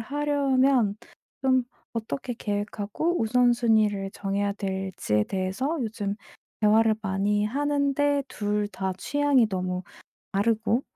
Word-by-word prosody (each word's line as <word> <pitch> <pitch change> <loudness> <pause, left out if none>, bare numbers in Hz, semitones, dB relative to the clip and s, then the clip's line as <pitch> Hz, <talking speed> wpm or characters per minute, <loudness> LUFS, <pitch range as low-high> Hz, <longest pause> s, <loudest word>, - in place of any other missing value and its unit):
하려면 270 -4 +2 0.5
좀 260 -2 +3 0.3
어떻게 240 +2 -4
계획하고 210 - -2
우선순위를 220 -4 +3
정해야 200 0 -1
될지에 190 - -1
대해서 195 - -2
요즘 210 -3 -2 0.5
대화를 220 +1 +4
많이 205 +1 0
하는데 285 +2 +1
2 210 -2 -1
다 190 -1 -3
취향이 285 0 +2
너무 185 -2 -2 0.5
다르고 225 +4 +1
220 Hz, 240 characters per minute, -26 LUFS, 200-265 Hz, 0.5 s, 대화를